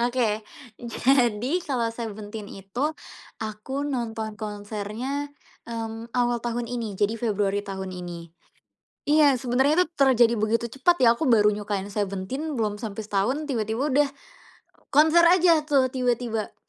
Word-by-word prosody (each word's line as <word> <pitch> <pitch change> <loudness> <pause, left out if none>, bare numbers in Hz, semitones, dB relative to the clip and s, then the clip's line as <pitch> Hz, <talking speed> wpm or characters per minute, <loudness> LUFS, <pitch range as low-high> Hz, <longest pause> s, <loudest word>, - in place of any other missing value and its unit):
Oke. 240 -3 +1 0.4
Jadi, 245 +4 +1
kalau 250 -9 -1
Seventeen 215 -2 -7
itu 195 +5 -8 0.6
aku 220 +6 -4
nonton 230 -5 -3
konsernya, 215 +6 -4 0.4
mmm, 225 0 -5
awal 240 -1 +1
tahun 240 0 -2
ini. 230 -4 -4
Jadi 210 +3 0
Februari 205 -3 0
tahun 190 -2 -6
ini. 175 -2 -8 0.7
Iya, 295 -2 +5
sebenernya 265 +8 +2
terjadi 255 -6 +4
begitu 230 +2 0
cepat 345 +7 +3
ya, 230 - +7
aku 260 +4 -1
baru 210 -3 +5
nyukain 205 -1 -3
Seventeen 205 +10 -3
belum 210 -2 -1
sampe 220 -2 -5
setahun 215 +9 0
tiba-tiba 245 +1 -1
udah 290 +1 +4 0.8
konser 320 +4 +5
aja 345 -2 +5
tuh 265 -3 +3
tiba-tiba, 240 -3 -1
230 Hz, 125 wpm, -25 LUFS, 210-265 Hz, 0.8 s, ya